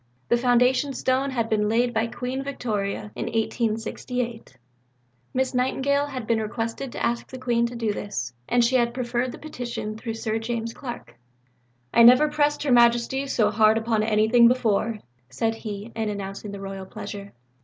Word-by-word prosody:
The - - +5
foundation 250 +3 +3
stone 260 +2 0
had 235 -4 -1
been 210 -1 +1
laid 240 +2 +2
by 220 +1 +1
Queen 250 +3 -4
Victoria 210 -6 -3
in - - -4
1868. 225 - -2 0.7
Miss 260 0 0
Nightingale 270 +3 +1
had 260 -5 -5
been 225 0 +1
requested 230 +4 -4
to - - -2
ask 235 0 -1
the 260 - -7
Queen 235 -2 +1
to 240 - -8
do 225 -3 -1
this, 165 -13 -4 0.2
and 240 -1 +4
she 255 +2 +3
had 235 -1 +1
preferred 245 0 -1
the - - -9
petition 240 -7 -5
through 225 0 -5
Sir 225 -1 -2
James 230 0 -3
Clark. 240 - -8 0.7
"I 235 - +6
never 250 +6 +8
pressed 295 -1 +1
Her 285 - 0
Majesty 240 +3 +4
so 215 -6 +2
hard 215 0 +4
upon 225 -1 +1
anything 220 +2 +5
before," 230 -2 +1 0.3
said 225 - -1
he, 215 0 -7
in 220 -1 -1
announcing 200 0 -5
the 200 - -7
Royal 195 -1 -6
pleasure. 200 -1 -8
235 Hz, 170 wpm, -25 LUFS, 220-250 Hz, 0.7 s, never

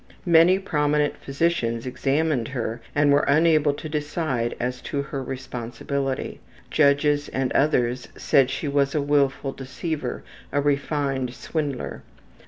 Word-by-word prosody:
Many 170 +2 +6
prominent 150 -5 +1
physicians 135 -6 -1
examined 135 0 0
her 120 -2 -4
and 145 0 +4
were 140 - +5
unable 155 0 +4
to 155 - -7
decide 150 -5 -2
as 125 +1 -3
to 140 -1 -3
her 140 -1 -5
responsibility; 130 +1 -4 0.3
judges 145 0 +3
and 135 -1 -1
others 125 -4 +1
said 135 -2 +3
she 140 +3 -3
was 140 0 +1
a - - +3
willful 140 -1 +1
deceiver, 145 +4 -4 0.3
a 145 - +1
refined 140 -3 0
swindler. 145 -5 -4
140 Hz, 125 wpm, -24 LUFS, 130-150 Hz, 0.3 s, Many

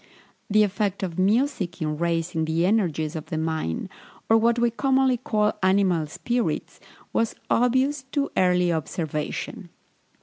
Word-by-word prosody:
The 215 +1 +5
effect 200 -1 -1
of 180 -2 -3
music 205 - +1
in 155 -1 -1
raising 165 -1 0
the 160 +2 +1
energies 170 -7 0
of 155 - -6
the 160 - -3
mind, 160 - -2 0.4
or 225 - +6
what 235 +1 +3
we 240 0 +2
commonly 265 0 +2
call 215 -5 +1
animal 185 -4 +2
spirits, 240 +10 -2 0.3
was 230 -1 0 0.2
obvious 260 +4 +2
to 285 -1 0
early 180 -1 +3
observation. 160 +4 -4
190 Hz, 135 wpm, -24 LUFS, 165-235 Hz, 0.4 s, or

